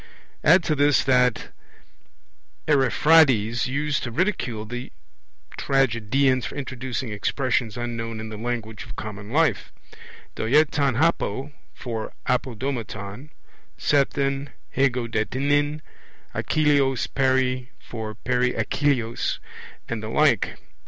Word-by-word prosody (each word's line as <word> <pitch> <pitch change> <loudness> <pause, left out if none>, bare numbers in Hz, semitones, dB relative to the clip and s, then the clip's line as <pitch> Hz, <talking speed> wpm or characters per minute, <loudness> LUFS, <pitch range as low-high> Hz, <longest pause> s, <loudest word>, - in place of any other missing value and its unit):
Add 180 - +6
to 155 - +1
this 145 -1 +3
that 125 -2 +2 1.2
Ariphrades 135 -5 +4
used 145 +2 -1
to 120 - -3
ridicule 120 - -1
the 125 +3 -6 0.7
tragedians 130 0 +2
for - - -9
introducing 130 -3 -4
expressions 120 +1 -1
unknown 115 -2 -4
in 110 0 -6
the 110 - -7
language 110 -1 -4
of - - -10
common 100 -1 -7
life, 145 -6 +1 0.6
doeaton 140 +1 +2
hapo 145 -4 0 0.2
(for 115 -3 -5
apo 125 -1 0
domaton), 115 0 -5 0.5
sethen, 140 0 +1 0.3
hego 130 -3 +2
de 110 -2 -1
nin, 145 +2 +1 0.5
Achilleos 140 -4 +2
peri 130 -1 +1
(for 110 -2 -7
peri 125 +1 0
Achilleos), 120 0 0 0.5
and 115 -2 -3
the 110 - -5
like. 135 -6 +2
130 Hz, 105 wpm, -24 LUFS, 115-140 Hz, 1.2 s, Add